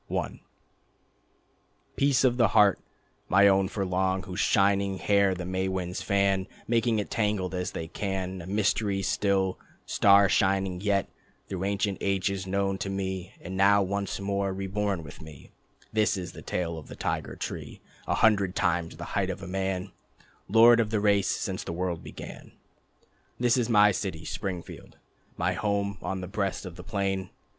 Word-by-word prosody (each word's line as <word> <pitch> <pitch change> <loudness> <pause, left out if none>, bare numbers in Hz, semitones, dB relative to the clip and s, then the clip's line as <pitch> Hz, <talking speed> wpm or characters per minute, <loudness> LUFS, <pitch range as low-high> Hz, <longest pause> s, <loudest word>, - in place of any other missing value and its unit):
I - - -3 1.5
Peace 140 -1 +3
of 125 -2 +3
the 120 -3 +5
Heart, 100 -2 +6 0.5
my 100 +2 +6
own 95 -1 +4
for 100 0 -3
long, 95 0 0
Whose 90 +1 -6
shining 100 -1 +2
hair 100 -1 +3
the 90 0 -5
May 95 +1 -1
winds 90 -1 -3
fan, 100 -1 +1 0.2
Making 115 -1 +2
it 105 - -3
tangled 105 -4 0
as 90 0 -3
they 80 - -4
can, 95 0 -3
A 85 - -9
mystery 100 0 0
still, 95 -1 +1 0.3
star 100 0 +5
shining 95 -2 +1
yet, 100 -1 +1 0.4
Through 95 -1 -3
ancient 100 0 -1
ages 95 -1 -1
known 95 0 0
to 95 - -3
me 95 -1 -4
And 90 +2 -6
now 100 +1 +5
once 100 +1 -2
more 100 0 -1
reborn 95 -1 -2
with 75 0 -11
me: 75 -3 -12 0.4
This 110 -1 +2
is 90 -2 -5
the - - -11
tale 85 -2 -3
of 75 - -13
the - - -9
Tiger - - -3
Tree - - -6 0.3
A - - +1
hundred 100 -4 +3
times 85 -4 0
the 85 - -6
height 95 -2 +1
of 95 +1 -5
a - - -6
man, 95 0 -2 0.6
Lord 115 +3 +7
of 110 -2 +1
the 110 -1 0
race 100 -1 +3
since - - -2
the - - -5
world 90 -1 -3
began. - - -10 0.9
This 120 -1 +3
is 120 -2 0
my 105 -2 +6
city 90 -5 -4
Springfield, 90 -4 -6 0.4
My - - +1
home 100 -2 -1
on 95 +1 -3
the 90 - -5
breast 100 0 -2
of 90 -2 -8
the 90 - -10
plain. 95 -2 -2
95 Hz, 170 wpm, -27 LUFS, 95-100 Hz, 1.5 s, Lord